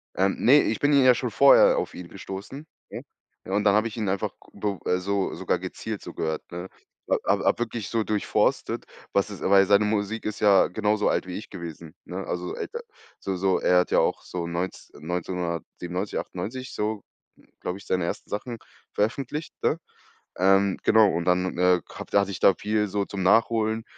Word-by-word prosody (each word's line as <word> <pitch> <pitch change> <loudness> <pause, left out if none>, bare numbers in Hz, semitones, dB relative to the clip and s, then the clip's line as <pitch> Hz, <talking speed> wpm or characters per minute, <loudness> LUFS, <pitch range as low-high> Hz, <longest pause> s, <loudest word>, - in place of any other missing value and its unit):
Ähm, 95 +1 +2
ne, 145 +4 +6
ich 110 - -1
bin 145 +1 +3
ihn 140 -2 +6
ja 130 - +7
schon - - -3
vorher - - +6
auf 475 - -2
ihn 90 -1 -8
gestoßen, 100 - -8 0.2
ja? - - -7 0.4
Ja, 95 - -5
und 105 - +2
dann 100 -1 +4
habe 110 +2 +2
ich 110 - -8
ihn 110 -4 -2
einfach 95 0 -1 0.2
g - - -15
b 100 -1 -1
äh, 90 - +3
so 100 +1 -1
sogar - - -1
gezielt, - - -6
so - - -9
gehört, 80 -1 -2
ne? 90 +2 -6 0.4
Ha - - +3
hab - - +2
hab - - +2
wirklich 115 -3 -3
so 115 -2 0
durchforstet, 105 -1 0 0.3
was 100 +1 +2
es 100 -4 -9
weil 100 0 +5
seine 100 +2 +4
Musik 105 +1 -1
ist 105 - -3
ja 100 -2 +5
genauso 105 0 +1
alt - - 0
wie 90 - -5
ich 105 - -9
gewesen, 85 -3 -8
ne? 95 +1 -5
Also, 90 0 -3
so - - -5
älter 470 - -5 0.4
so 95 -1 -3
so 95 0 +1
er 90 0 +4
hat 90 - -1
ja - - +4
auch - - 0
so 85 -2 -5
neunz 85 +2 -4
1997, 90 +2 -4
98 130 +8 -6
so, 105 -1 -2 0.6
glaube 90 +2 -4
ich, 100 - -15
seine 90 -2 0
ersten - - -5
Sachen 115 +3 -4 0.3
veröffentlicht, 135 +8 -2
ne? 160 - +1 0.6
Ähm, 95 +1 +3
genau, 110 -2 +5
und 85 0 -2
dann 90 0 +1
äh, 90 -1 +4
hatt - - -9
hatte 100 -1 +3
ich 90 - -6
da 95 - +6
viel 105 0 0
so 100 0 -1
zum 95 -1 -4
Nachholen, 110 +2 +2
100 Hz, 205 wpm, -25 LUFS, 90-110 Hz, 0.6 s, ja